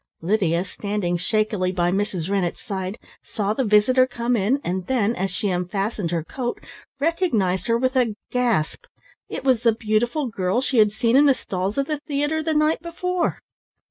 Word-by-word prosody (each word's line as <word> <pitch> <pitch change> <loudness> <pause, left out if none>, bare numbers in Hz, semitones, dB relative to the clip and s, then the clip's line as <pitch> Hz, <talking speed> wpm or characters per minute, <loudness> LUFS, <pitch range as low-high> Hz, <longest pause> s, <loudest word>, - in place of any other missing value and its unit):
Lydia, 180 -2 +1
standing 200 -2 -2
shakily 205 0 0
by 175 -1 +1
Mrs. 195 -4 -1
Rennett's 195 -3 -1
side, 190 +1 -4 0.2
saw 210 -1 -2
the 265 - 0
visitor 245 +4 +4
come 240 -1 -1
in, 230 +6 +1
and 180 0 -3
then, 235 -3 +1
as 190 +2 -1
she 195 +2 -2
unfastened 195 +2 -2
her 165 -2 -1
coat, 240 - -4 0.4
recognised 240 - +1
her 230 0 +3
with 255 +2 0
a 240 -5 +2 0.2
gasp. 240 -11 0 0.4
It - - -5
was 260 -4 +3
the 230 -2 +4
beautiful 235 +6 0
girl 200 -1 0
she 260 -2 +1
had 210 -1 +5
seen 230 +2 +1
in 290 +2 +6
the 275 - +5
stalls 190 +1 -3
of 275 - +1
the 300 0 -3
theatre 295 +2 -1
the 315 0 -1
night 305 +1 +2
before! 350 +1 -2
215 Hz, 175 wpm, -23 LUFS, 190-260 Hz, 0.4 s, in